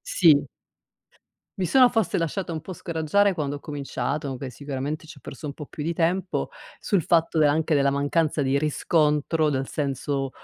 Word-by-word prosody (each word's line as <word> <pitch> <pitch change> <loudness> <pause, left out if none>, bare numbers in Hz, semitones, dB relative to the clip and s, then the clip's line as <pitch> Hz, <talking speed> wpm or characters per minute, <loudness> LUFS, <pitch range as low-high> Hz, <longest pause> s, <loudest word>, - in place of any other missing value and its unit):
sì. - - +4 1.1
Mi 185 - 0
sono 250 +7 +6
forse 225 -7 0
lasciata 170 +2 -2
un 155 -1 -4
po' 185 - -7
scoraggiare, 175 +4 +1
quando 145 -2 -2
ho - - -10
cominciato, 140 -1 -4
che 135 +1 -5
sicuramente 140 +4 -5
ci 160 -2 -12
ho - - -22
perso 135 - -10
un 145 - -3
po' 150 +1 -9
più 150 - -7
di 165 +3 -1
tempo, 175 +3 0 0.3
sul 195 -5 +1
fatto 165 0 +2
della 150 -2 +5
anche 160 +1 +1
della 140 -1 +3
mancanza 145 +2 0
di 135 0 +1
riscontro, 150 +1 +1
dal 135 -1 -2
senso, 140 -1 -2
150 Hz, 180 wpm, -25 LUFS, 140-170 Hz, 1.1 s, sono